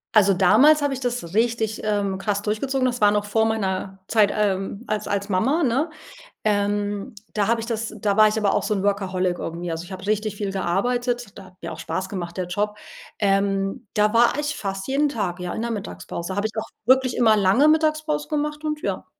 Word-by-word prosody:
Also, 200 -2 +6
damals 260 +12 +5
habe 285 - +1
ich 265 - -4
das 240 -9 -3
richtig, 225 -1 0
ähm, 200 -2 0
krass 205 0 -1
durchgezogen. 255 +5 -1
Das 245 -2 -1
war 205 - +6
noch 205 0 +1
vor 220 +2 +1
meiner 195 -3 -2
Zeit, 210 -3 +3
ähm, 200 +1 -1
als 215 0 -2
als 200 0 -1
Mama, 245 - +1
ne? 270 +5 +1 0.5
Ähm, 205 -1 0 0.2
da 205 -1 +1
habe 230 0 +2
ich 225 - -5
das 225 -1 -3
da 205 0 0
war 215 0 +8
ich 215 - 0
aber 210 -2 +1
auch - - +1
so 215 - 0
'n 195 - -1
Workaholic 185 -3 0
irgendwie. 170 +1 -5
Also, 165 +1 -3
ich 175 - -12
habe 190 +1 -7
richtig 215 0 0
viel 200 -1 -3
gearbeitet, 240 +5 -1
der 195 - -10
hat 185 - -17
mir - - -5
auch - - -7
Spaß 190 0 -4
gemacht 175 -2 -5
der 180 -1 -2
Job. 210 +3 -1 0.4
Ähm, 195 +3 0
da 210 +1 +2
war 235 +1 +5
ich 295 0 -2
fast 195 +1 -4
jeden 285 +2 +2
Tag, 190 -8 -3
ja, 180 0 -4
in 220 - -3
der 235 - -2
Mittagspause. 175 - -5
Habe 205 +2 0
ich 220 - -11
auch - - -3 0.2
wirklich 260 0 +4
immer 220 -3 +4
lange 200 +9 +4
Mittagspause 310 -1 +1
gemacht 300 0 -2
und 305 0 -2
ja. - - -3
210 Hz, 215 wpm, -23 LUFS, 195-240 Hz, 0.5 s, war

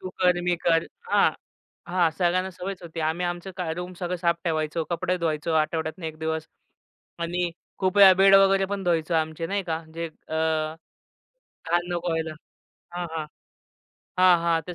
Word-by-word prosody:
तू 185 - -6
कर, 180 -1 +3
मी 180 -1 +2
कर. 165 -1 +4 0.3
हां, - - +5 0.6
हां. 175 -2 +2
सगळ्यांना 185 +1 +1
सवयच 185 +1 -6
होती. 165 -1 -7
आम्ही 175 +2 -2
आमचं 175 +2 -4
क - - -2 0.2
रूम 180 +1 -5
सगळं 180 0 -2
साफ 170 -1 +1
ठेवायचो, 160 -1 -1
कपडे 180 +1 -1
धुवायचो 160 -1 -1
आठवड्यातून 160 +2 -3
1 155 -1 -6
दिवस. 160 0 -2 0.7
आणि 175 +1 -1 0.3
खूप 190 +1 0
वेळा 195 -2 +10
बेड 195 +1 +6
वगैरे 195 0 +5
पण 200 0 -4
धुवायचं 170 -1 +1
आमचे 160 +1 -1
नाही 200 +1 -1
का, 165 -2 -3
जे 165 +1 -3
अ, 160 0 -9 1.4
घाण 175 0 +2
नको 175 0 -2
व्हायला. 160 -1 -2 0.6
हां, 175 - -2
हां. 155 -1 -2 0.9
हां, 180 -2 +6
हां. 165 -1 +2
त्या 180 - -6
175 Hz, 165 wpm, -25 LUFS, 165-185 Hz, 1.4 s, वेळा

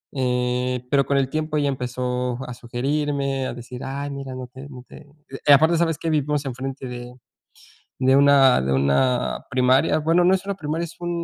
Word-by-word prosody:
Eh, 125 0 -1
pero 140 -1 +3
con 140 - +1
el 135 -1 +1
tiempo 155 0 -2
ella 145 -1 +1
empezó 125 -1 -3
a 125 - -6
sugerirme, 135 +2 -2
a - - -5
decir: 125 +1 -9
"Ay, 140 +1 -4
mira, 135 -2 -6
no 130 0 -6
te 130 +3 -11
no 125 -3 -11
te", 150 - -14 0.4
y - - +7
aparte, 160 +4 +6
¿sabes 165 -2 +1
qué? 165 - -2
Vivimos 150 -1 0
enfrente 130 +1 -5
de 125 0 -8 0.9
de 130 0 +3
una 140 -2 +5
de 65 +1 -1
una 70 - +1
primaria. 130 +4 +3
Bueno, 165 +3 +2
no 185 - +5
es 190 - -2
una 200 - -2
primaria, 160 -1 -3
es 170 - -9
un 175 0 -3
135 Hz, 190 wpm, -22 LUFS, 125-145 Hz, 0.9 s, y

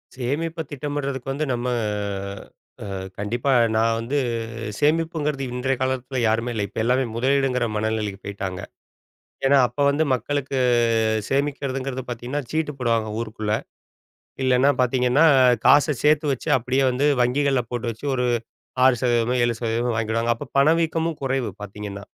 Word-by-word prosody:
சேமிப்ப 160 +6 -2
திட்டமிடுறதுக்கு 140 -2 -3
வந்து 150 +3 -2
நம்ம, 120 +1 -2 1.2
அ - - -6 0.3
கண்டிப்பா 120 +7 -1 0.2
நான் 115 +1 +2
வந்து 130 +6 -2 0.6
சேமிப்புங்கிறது 150 -2 0
இன்றைய 130 +1 0
காலத்துல 130 0 -2
யாருமே 115 +2 0
இல்ல. 105 - -1
இப்ப 105 - -9
எல்லாருமே 125 +2 +2
முதலீடுங்கிற 130 0 +1
மனநிலைக்கு 105 -2 -2
போய்ட்டாங்க. 95 -2 -5 0.9
ஏன்னா, 140 - +5
அப்ப 125 +5 -5
வந்து 145 +3 +2
மக்களுக்கு 135 +2 -2 0.7
சேமிக்கிறதுங்கிறது 135 -2 -2
பாத்தீங்கன்னா, 125 +5 -4
சீட்டு 155 -2 -1
போடுவாங்க 115 -3 0
ஊருக்குள்ள. 110 -2 -2 0.9
இல்லனா 130 +2 +4
பாத்தீங்கன்னா, 125 +3 +3 0.4
காச 145 +1 +6 0.2
சேர்த்து 150 +1 +4
வச்சு 130 - -5
அப்படியே 130 +2 0
வந்து 135 +4 0 0.2
வங்கிகள்ல 135 +1 +2
போட்டு 120 -1 -3
வச்சு, 115 +6 -10
ஒரு 125 -1 0 0.6
6%மோ, 120 -1 +2
7%மோ 120 0 -1
வாங்கிடுவாங்க. 115 +1 0
அப்ப 135 +1 -9
பணவீக்கமும் 160 +2 +2
குறைவு 135 -2 -1
பாத்தீங்கன்னா. 100 0 -7
130 Hz, 120 wpm, -23 LUFS, 115-140 Hz, 1.2 s, காச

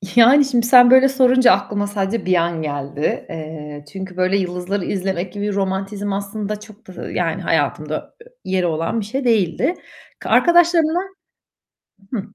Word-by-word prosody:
Yani, 260 +5 +6
şimdi 240 -3 0
sen 245 0 +7
böyle 260 +1 +6
sorunca 255 -1 +4
aklıma 205 0 0
sadece 200 +1 -3
bir 185 -1 +2
an 170 -1 0
geldi. 145 0 -3
Eee, 155 -2 -8
çünkü 190 -1 -8
böyle 185 +2 +1
yıldızları 180 +1 -3
izlemek 190 -2 -3
gibi 205 0 -3
romantizm 195 +1 -3
aslında 205 +1 -4
çok 215 0 -16
da 185 - -8
yani - - -2
hayatımda - - -2
e - - -15 0.2
yeri 185 -1 -1
olan 165 +6 -1
bir 210 - -4
şey 260 +6 -4
değildi. 230 - +1 0.5
K - - -7
arkadaşlarımla 345 -1 +4 1.1
Hı. 225 - -1
200 Hz, 150 wpm, -19 LUFS, 180-240 Hz, 1.1 s, sen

